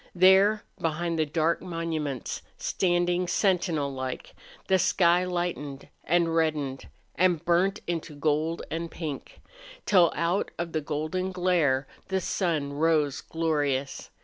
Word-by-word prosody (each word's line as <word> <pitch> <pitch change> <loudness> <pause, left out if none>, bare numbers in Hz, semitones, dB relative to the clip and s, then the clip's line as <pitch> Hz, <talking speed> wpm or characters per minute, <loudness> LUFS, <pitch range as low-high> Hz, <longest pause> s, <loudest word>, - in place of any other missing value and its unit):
There, 190 +4 +5 0.2
behind 165 +1 -1
the 155 - +2
dark 160 +2 +1
monuments, 165 -7 -3 0.2
standing 175 0 +1
sentinel 175 -7 +1
like, 130 -1 -5 0.3
the 190 0 +3
sky 180 -2 +3
lightened 175 -6 -3
and 170 0 +2
reddened 150 -5 -1 0.3
and 180 -2 +2
burnt 175 +3 +2
into 165 -3 -4
gold 155 +3 0
and 165 +1 -3
pink, 155 -4 -7 0.4
till 180 -4 +5
out 170 +4 0
of 170 -1 -3
the 155 - -1
golden 155 +5 -2
glare 175 -7 +2 0.2
the 190 0 0
sun 160 -6 -1
rose 150 -2 +1
glorious. 145 -4 -1
165 Hz, 120 wpm, -27 LUFS, 150-180 Hz, 0.4 s, There